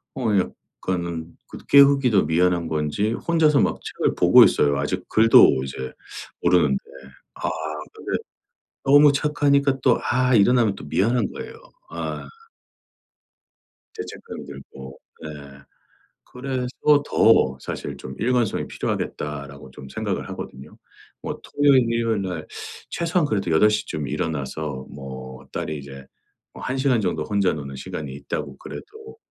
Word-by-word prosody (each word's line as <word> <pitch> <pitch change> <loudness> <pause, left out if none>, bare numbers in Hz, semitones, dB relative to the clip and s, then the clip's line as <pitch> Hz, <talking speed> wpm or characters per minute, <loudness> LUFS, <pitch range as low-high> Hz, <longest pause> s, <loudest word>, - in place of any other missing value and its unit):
어 135 - -5 0.2
약간은 85 -3 -4
그래도 - - -11
깨우기도 140 - +5
미안한 85 +1 +2
건지 80 +8 -1
혼자서 155 -4 +4
막 - - 0
책을 - - -1
보고 - - +7
있어요 70 -1 +3
아직 75 - -3
글도 110 -11 +6
이제 65 -1 -6 0.5
모르는데. 75 -7 +3 0.6
아 - - -2 0.4
근데 - - -3 0.7
너무 145 +1 +7
착하니까 140 -1 +2
또 125 - +4
아 130 +1 +1
일어나면 115 -1 +4
또 - - -10
미안한 115 +11 +1
거예요. - - -8 0.4
아. - - -5 1.7
죄책감이 445 +1 -8
들고 65 0 -11 0.2
네. - - -6 1.0
그래서 125 -1 -4 0.4
더 65 -12 +4
사실 - - -5
좀 65 - -8
'일관성이 120 -2 0
필요하겠다.'라고 70 -2 -5
좀 65 - -11
생각을 - - -3
하거든요. 65 +1 -9 0.4
뭐 - - -5
토요일, 140 -3 +3
일요일날 100 -8 -1 0.4
최소한 170 -1 0
그래도 100 - -1
8:00 105 +6 +3
쯤 75 -2 -4
일어나서 70 -3 -3
뭐 65 -1 -9
딸이 75 - -3
이제 70 -1 -10 0.5
어 - - -11
1 130 +1 -3
시간 130 -3 +2
정도 90 - -1
혼자 100 -3 +1
노는 70 -3 -7
시간이 70 +1 -6
있다고 70 +1 -5
그래도 440 +1 -11
95 Hz, 275 characters per minute, -23 LUFS, -, 1.7 s, 보고